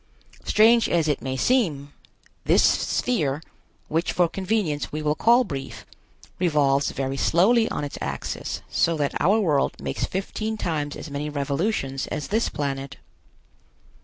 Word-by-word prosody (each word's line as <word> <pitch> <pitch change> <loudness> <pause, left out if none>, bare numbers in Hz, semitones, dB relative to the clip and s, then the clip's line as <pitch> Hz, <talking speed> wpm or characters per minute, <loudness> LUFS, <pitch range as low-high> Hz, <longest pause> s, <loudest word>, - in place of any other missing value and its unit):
Strange 225 +1 +4
as 165 -2 +2
it 150 - 0
may 130 0 -3
seem, 150 - +1 0.5
this - - +4
sphere, 150 - +1 0.5
which 165 +2 0
for 175 -1 +3
convenience 190 -5 -2
we 155 - -3
will 150 -1 +1
call 235 +10 +4
Brief, 140 - -7 0.5
revolves 145 -5 +2
very 135 0 -3
slowly 220 - +3
on - - -3
its 145 - -6
axis, 70 -1 -4
so 165 -1 +1
that 145 -2 -1
our 200 +8 +4
world 155 -9 +1
makes - - -2
fifteen 215 +3 -3
times 150 -6 -2
as 150 - -8
many 145 +1 -3
revolutions 140 0 -2
as 145 - -4
this 220 +3 +1
planet. 140 -1 -4
150 Hz, 140 wpm, -24 LUFS, 140-205 Hz, 0.5 s, Strange